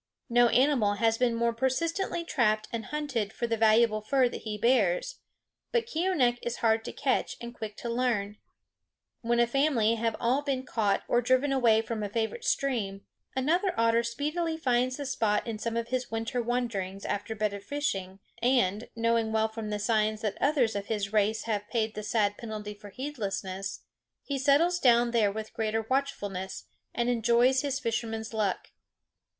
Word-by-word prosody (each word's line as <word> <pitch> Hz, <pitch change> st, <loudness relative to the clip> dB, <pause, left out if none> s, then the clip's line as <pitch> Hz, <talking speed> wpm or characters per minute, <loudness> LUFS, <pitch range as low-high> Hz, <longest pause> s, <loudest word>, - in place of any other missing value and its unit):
No 240 Hz, 0 st, +6 dB
animal 245 Hz, -4 st, +3 dB
has 225 Hz, +1 st, +1 dB
been 245 Hz, -2 st, +2 dB
more 235 Hz, 0 st, +1 dB
persistently 330 Hz, +9 st, -1 dB
trapped 215 Hz, -9 st, +1 dB
and 225 Hz, -1 st, -3 dB
hunted 280 Hz, -9 st, -2 dB
for 235 Hz, -, -3 dB
the 230 Hz, -1 st, 0 dB
valuable 220 Hz, 0 st, +4 dB
fur 255 Hz, +4 st, +2 dB
that -, -, -7 dB
he 215 Hz, -1 st, -4 dB
bears; 235 Hz, -, +2 dB, 0.5 s
but 475 Hz, -1 st, +1 dB
Keeonekh 320 Hz, -, +1 dB
is 240 Hz, 0 st, -3 dB
hard 225 Hz, 0 st, +3 dB
to -, -, -4 dB
catch -, -, -1 dB
and 235 Hz, 0 st, -7 dB
quick 215 Hz, -3 st, -7 dB
to -, -, -6 dB
learn. 230 Hz, -4 st, -1 dB, 0.8 s
When 235 Hz, 0 st, +1 dB
a 240 Hz, -, +5 dB
family 240 Hz, -3 st, +2 dB
have 225 Hz, 0 st, 0 dB
all 250 Hz, +4 st, +2 dB
been 275 Hz, -3 st, -2 dB
caught 210 Hz, -5 st, 0 dB
or 240 Hz, -, +3 dB
driven 255 Hz, +3 st, +2 dB
away 230 Hz, -4 st, +4 dB
from 225 Hz, -1 st, -4 dB
a 205 Hz, -, -3 dB
favorite 225 Hz, -, -2 dB
stream, 210 Hz, -8 st, -1 dB, 0.3 s
another 340 Hz, +8 st, +1 dB
otter 230 Hz, 0 st, +3 dB
speedily 300 Hz, +8 st, -2 dB
finds 255 Hz, -3 st, +1 dB
the 285 Hz, -, -5 dB
spot 220 Hz, -6 st, 0 dB
in 225 Hz, -3 st, -4 dB
some 230 Hz, +1 st, -2 dB
of 235 Hz, 0 st, -3 dB
his 255 Hz, -1 st, -2 dB
winter 225 Hz, +2 st, -2 dB
wanderings 225 Hz, -6 st, -2 dB
after 215 Hz, +2 st, -3 dB
better 210 Hz, -1 st, -1 dB
fishing, 195 Hz, -6 st, -3 dB, 0.2 s
and, 235 Hz, -4 st, +1 dB
knowing 230 Hz, -1 st, +1 dB
well 220 Hz, 0 st, +1 dB
from 220 Hz, -1 st, -6 dB
the 210 Hz, -, -1 dB
signs 215 Hz, 0 st, +1 dB
that 210 Hz, -2 st, -1 dB
others 270 Hz, -7 st, +2 dB
of 200 Hz, 0 st, -3 dB
his 205 Hz, -2 st, -2 dB
race 215 Hz, +1 st, +2 dB
have 210 Hz, -2 st, -3 dB
paid 220 Hz, -2 st, 0 dB
the 215 Hz, -, -5 dB
sad 210 Hz, -1 st, 0 dB
penalty 215 Hz, -2 st, -6 dB
for 205 Hz, 0 st, -12 dB
heedlessness, 195 Hz, -7 st, -4 dB, 0.4 s
he 280 Hz, -1 st, -3 dB
settles 310 Hz, +6 st, +3 dB
down 240 Hz, -4 st, +4 dB
there 220 Hz, -4 st, +3 dB
with 215 Hz, +1 st, -6 dB
greater 220 Hz, 0 st, -1 dB
watchfulness, 205 Hz, -9 st, -2 dB, 0.3 s
and 240 Hz, 0 st, -1 dB
enjoys 240 Hz, +2 st, +3 dB
his 280 Hz, -2 st, -2 dB
fisherman's 225 Hz, -3 st, -3 dB
luck. 210 Hz, -3 st, -1 dB
230 Hz, 175 wpm, -29 LUFS, 215-255 Hz, 0.8 s, No